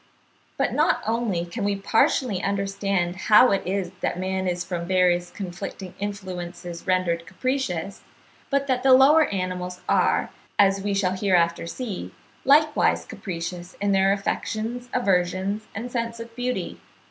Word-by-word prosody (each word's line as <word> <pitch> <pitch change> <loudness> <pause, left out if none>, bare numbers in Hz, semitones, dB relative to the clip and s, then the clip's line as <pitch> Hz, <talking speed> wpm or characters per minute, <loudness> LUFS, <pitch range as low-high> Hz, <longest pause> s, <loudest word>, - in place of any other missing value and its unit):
But - - 0
not - - +2
only 220 -6 0
can 200 +5 -5
we 200 0 +1
partially 200 +1 +1
understand 195 -2 -1
how 210 +5 +6
it 195 - +2
is 190 -2 -1
that - - -1
man 190 0 -2
is 175 0 -1
from 175 -2 -4
various 180 -1 +2
conflicting 190 0 -7
influences 180 -3 -6
rendered 175 -2 +1
capricious, 195 -3 -2 0.5
but 280 0 +1
that 260 -2 0
the 265 0 +6
lower 290 +4 +6
animals 180 -1 -4
are, - - +2 0.3
as 195 -1 +4
we 200 0 -1
shall 190 -2 +1
hereafter 175 -4 +1
see, 185 - -6 0.3
likewise 300 +2 +4
capricious 175 -1 -6
in 205 0 +1
their 195 0 +4
affections, 225 +4 -2
aversions, 195 -1 0
and 240 +4 -5
sense 230 -1 -3
of 230 0 -9
beauty. 250 +1 -3
195 Hz, 140 wpm, -24 LUFS, 180-225 Hz, 0.5 s, how